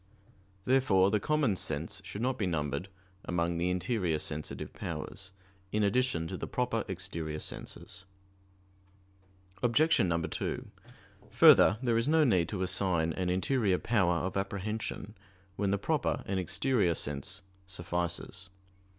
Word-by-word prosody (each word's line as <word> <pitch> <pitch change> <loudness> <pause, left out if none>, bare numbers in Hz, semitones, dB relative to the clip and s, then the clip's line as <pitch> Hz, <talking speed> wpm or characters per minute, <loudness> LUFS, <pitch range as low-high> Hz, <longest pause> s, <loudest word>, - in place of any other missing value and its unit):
Therefore 105 -8 +4
the 105 - +2
common 145 -4 +1
sense 80 +2 -2
should 100 +4 -5
not 130 +1 0
be 100 - +1
numbered 75 +1 -2 0.3
among 85 -1 -1
the 90 +1 +1
interior 90 -2 0
sensitive 75 0 -3
powers, 95 0 -6 0.4
in 105 0 +1
addition 100 -5 +1
to 95 - -5
the - - -5
proper 125 -2 -1
exterior 85 -5 -4
senses. 95 +4 -6 1.6
Obj. 150 +7 +4
2: 85 -3 -1 0.6
Further, 105 - +7
there 120 -2 +2
is 115 - -1
no 160 +1 +5
need 95 - +3
to 95 -3 -2
assign 90 -3 +1
an 90 +1 -2
interior 95 +2 +1
power 95 -7 +2
of 95 - -3
apprehension 100 +1 -3 0.4
when 100 0 0
the 100 - +2
proper 100 - -1
and 95 -1 -1
exterior 95 0 +1
sense 95 +9 -3 0.2
suffices. 90 0 -3
95 Hz, 130 wpm, -31 LUFS, 85-110 Hz, 1.6 s, Further